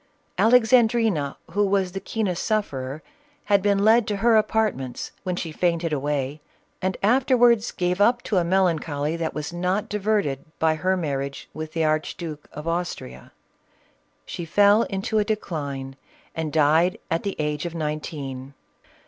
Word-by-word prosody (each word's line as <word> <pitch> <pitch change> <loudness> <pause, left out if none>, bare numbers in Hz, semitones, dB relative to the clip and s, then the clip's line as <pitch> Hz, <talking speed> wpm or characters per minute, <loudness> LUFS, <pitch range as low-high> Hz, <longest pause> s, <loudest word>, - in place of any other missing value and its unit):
Alexandrina, 225 - +3
who 205 - +2
was 195 -2 +1
the 195 - -4
keenest 195 -4 -2
sufferer, 145 - -2 0.4
had 200 -1 +3
been 200 0 +2
led 225 0 +5
to 210 - -1
her 225 +3 +3
apartments, 215 - 0
when 180 -2 -2
she 165 -2 -4
fainted 170 0 0
away, 145 0 -2 0.4
and 185 0 -1
afterwards 245 -1 +4
gave 180 +2 -1
up 240 +3 +3
to 205 - -1
a 180 - +3
melancholy, 165 -4 0
that 165 -1 -3
was 150 +2 -4
not 185 +4 -1
diverted 205 -9 0
by 160 -1 +2
her 185 +4 0
marriage 140 -4 -3
with 155 +1 -6
the 165 -1 +1
Archduke 155 0 -2
of 150 +2 -8
Austria. 165 - -4 0.9
She 175 - -6
fell 205 +6 +4
into 195 +2 -1
a - - +3
decline, 145 -10 -4 0.4
and 160 -2 -3
died 160 +4 +3
at 165 - +1
the 200 - -3
age 150 +1 -2
of 170 - -8
nineteen. 145 -4 -5
175 Hz, 150 wpm, -24 LUFS, 150-205 Hz, 0.9 s, led